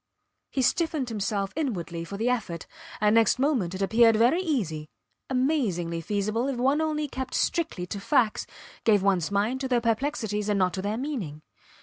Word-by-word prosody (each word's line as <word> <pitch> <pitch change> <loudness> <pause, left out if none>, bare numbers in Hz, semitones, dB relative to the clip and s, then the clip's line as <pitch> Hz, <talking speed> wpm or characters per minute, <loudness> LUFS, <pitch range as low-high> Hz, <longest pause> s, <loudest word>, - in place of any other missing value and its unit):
He 265 - 0
stiffened 310 -3 +1
himself 200 -2 -2
inwardly 180 - -3
for 200 +4 -6
the 225 +3 -1
effort, 205 -10 -1 0.3
and 210 0 +3
next 225 +1 +4
moment 250 - +1
it 195 - -2
appeared 225 +2 +5
very 245 +11 +4
easy, 180 - -2 0.4
amazingly 235 - 0
feasible, 215 - -1
if 275 -3 -2
one 270 +5 +2
only 305 -1 -1
kept 260 -1 -5
strictly 320 - 0
to 200 +3 -5
facts, 230 -1 +1 0.4
gave 210 -4 +4
ones 190 -5 +2
mind 210 +6 0
to 265 - -1
their 250 -2 +2
perplexities 225 -3 -1
and 205 - +2
not 185 -2 +2
to 190 - -3
their 205 +3 -2
meaning. 220 - -4
225 Hz, 170 wpm, -27 LUFS, 195-265 Hz, 0.4 s, appeared